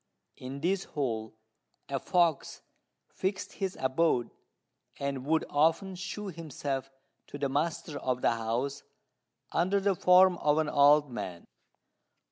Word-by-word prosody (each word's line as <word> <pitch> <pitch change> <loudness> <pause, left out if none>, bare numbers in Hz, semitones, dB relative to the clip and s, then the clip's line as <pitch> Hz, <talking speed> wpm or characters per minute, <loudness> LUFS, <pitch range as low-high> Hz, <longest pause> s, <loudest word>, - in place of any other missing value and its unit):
In 135 +2 -7
this 185 +3 0
hole 110 -6 -3 0.5
a 140 -1 -2
fox 170 0 +1 0.4
fixed 190 +1 -3
his 190 -2 -3
abode, 130 -1 +1 0.7
and 140 -1 -3
would 160 +1 +2
often 165 +6 +2
shew 195 +3 -5
himself 145 -5 -4 0.4
to - - -8
the 140 -1 -1
master 150 +1 -2
of 125 -1 -2
the - - +4
house 120 +5 -2 0.7
under 185 +4 +2
the 195 0 +2
form 180 0 +5
of 150 0 +2
an 155 -1 +1
old 145 -1 +5
man. 90 -7 -6
150 Hz, 125 wpm, -30 LUFS, 135-180 Hz, 0.7 s, form